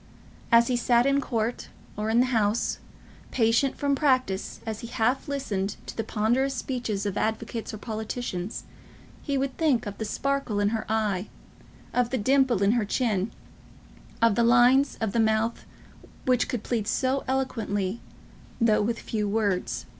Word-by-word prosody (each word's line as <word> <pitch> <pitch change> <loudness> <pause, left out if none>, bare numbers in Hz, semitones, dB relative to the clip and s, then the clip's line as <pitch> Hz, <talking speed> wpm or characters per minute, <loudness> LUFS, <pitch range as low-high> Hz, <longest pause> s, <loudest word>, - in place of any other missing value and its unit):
As 235 0 +7
he 250 - 0
sat 240 0 +3
in 275 0 +3
court, 230 -2 -2 0.3
or 210 +1 -2
in 230 +2 +4
the - - +3
House, 215 0 +1 0.5
patient 235 +3 +2
from 285 -1 +1
practice 255 -9 +1
as 220 -1 -4
he 235 - -7
half 245 +6 0
listened 210 -9 -2
to - - -8
the 225 - -2
ponderous 245 +7 +1
speeches 235 -6 -3
of 200 - -1
advocates 220 +1 -2
or 215 - -6
politicians, 220 -3 -4 0.6
he 280 -2 -1
would 270 -1 -1
think 295 -8 +2
of 205 -1 -6
the 220 - -2
sparkle 275 -2 -1
in 205 0 +2
her 220 -2 -3
eye, 215 -3 0 0.7
of 245 -1 +2
the 260 - -1
dimple 255 -2 +3
in 200 - +4
her 235 -1 +2
chin, 210 -2 0 0.9
of 230 -2 +5
the 235 - +2
lines 245 +4 +5
of 220 -3 -1
the 230 - 0
mouth 220 +1 +1 0.6
which 250 -2 +2
could 235 -4 -3
plead 225 -4 -2
so 265 +1 0
eloquently, 225 -6 -1 0.6
though 230 -3 +4
with 230 +3 0
few 210 -3 -2
words. 195 - -1
230 Hz, 160 wpm, -26 LUFS, 210-255 Hz, 0.9 s, As